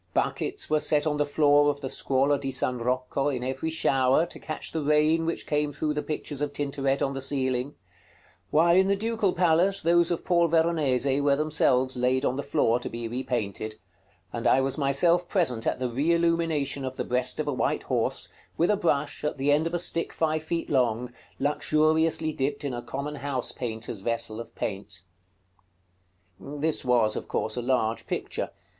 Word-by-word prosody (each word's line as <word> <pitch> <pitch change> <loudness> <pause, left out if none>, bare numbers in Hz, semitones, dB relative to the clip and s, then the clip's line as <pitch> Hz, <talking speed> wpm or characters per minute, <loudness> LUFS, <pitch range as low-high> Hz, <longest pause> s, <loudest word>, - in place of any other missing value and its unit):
Buckets - - -1
were 155 0 +2
set 150 0 +2
on 150 -1 0
the 145 0 +1
floor 145 0 +4
of 145 0 -3
the 135 - -3
Scuola 135 +2 +1
di 135 - -3
San 125 -1 -1
Rocco, 130 +3 -1
in 130 -4 -2
every 130 +5 -2
shower, 135 -2 +2
to - - -10
catch 155 - -6
the 160 - -2
rain 150 +2 +2
which 165 - -2
came 150 0 0
through 150 +2 -2
the 150 - -2
pictures 150 -2 -5
of 145 -1 -2
Tintoret 140 -1 -1
on 135 - -1
the 135 - -5
ceiling; 130 0 -1 0.7
while 170 +3 +4
in 190 +1 +4
the 200 - +3
Ducal 220 -1 0
Palace, 175 +3 +2
those 170 +1 +4
of 175 - -2
Paul 170 -2 +3
Veronese 150 -5 +1
were 140 -1 +3
themselves 130 -4 +2
laid 130 +2 +1
on 125 - +1
the 140 - -2
floor 120 -3 +1
to - - -5
be 115 0 -5
repainted; 110 -3 -3 0.6
and - - -1
I 130 - +5
was 135 0 0
myself 170 +5 +2
present 130 - 0
at - - 0
the 130 - -2
re 140 +8 +1
illumination 165 -5 0
of 130 0 -5
the - - -1
breast 125 +3 +1
of 155 - -2
a 145 - 0
white 125 - -1
horse, - - -1 0.3
with 170 +5 +3
a 210 - +2
brush, 150 -6 -1
at 150 - -2
the 140 +2 +1
end 150 +3 +3
of 165 - -6
a - - +2
stick 170 -1 +1
five 155 -1 0
feet 165 0 -3
long, 125 -2 +1 0.2
luxuriously 155 +2 +1
dipped 140 +2 -2
in 140 -3 -3
a 120 - -4
common 140 +5 -5
house 135 -3 -3
painter's 115 -2 -5
vessel 115 +1 -2
of 115 0 -9
paint. 95 -3 -5 1.4
This 150 +2 -3
was, 120 -4 +2
of - - -5
course, 110 - -2
a 125 - -2
large 120 -3 0
picture. - - -3
145 Hz, 190 wpm, -26 LUFS, 130-160 Hz, 1.4 s, I